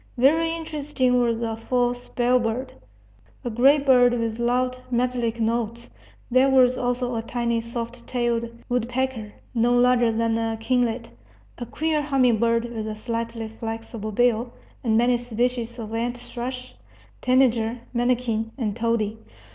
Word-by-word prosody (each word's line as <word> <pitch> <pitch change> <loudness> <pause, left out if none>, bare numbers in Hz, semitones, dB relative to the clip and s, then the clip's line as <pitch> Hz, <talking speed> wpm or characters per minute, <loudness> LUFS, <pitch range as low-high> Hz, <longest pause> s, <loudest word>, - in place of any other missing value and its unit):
Very 320 +6 +4
interesting 295 -6 0
was 235 -1 0
the 225 -1 -2
false 245 +1 -1
bellbird, 245 0 +1 0.7
a 240 - -2
gray 265 +6 +5
bird 250 -3 +4
with 230 -1 -2
loud, 250 +1 0
metallic 240 -2 0
notes. 230 +1 -2 0.4
There 255 +2 +5
was 255 -1 +5
also 245 0 -1
a 225 - -1
tiny 235 0 -1
soft 235 +1 -6
tailed 235 -2 0 0.2
woodpecker, 245 -2 -2 0.2
no 240 0 +2
larger 245 -1 +4
than 225 0 0
a 225 0 -1
kinglet; 235 0 0 0.5
a 240 - -5
queer 315 +2 0
humming 260 -6 +2
bird 230 0 +2
with 220 -1 -4
a 215 - -4
slightly 230 0 -4
flexible 225 -1 -5
bill; 240 +1 +2 0.3
and 220 -3 +2
many 240 +1 +3
species 240 0 -2
of 220 -2 -6
ant 240 +2 -1
thrush, 250 +1 -6 0.5
tanager, 245 -2 +2
manakin, 240 -2 0
and 215 -6 -2
tody. 225 -2 -1
240 Hz, 140 wpm, -24 LUFS, 230-250 Hz, 0.7 s, gray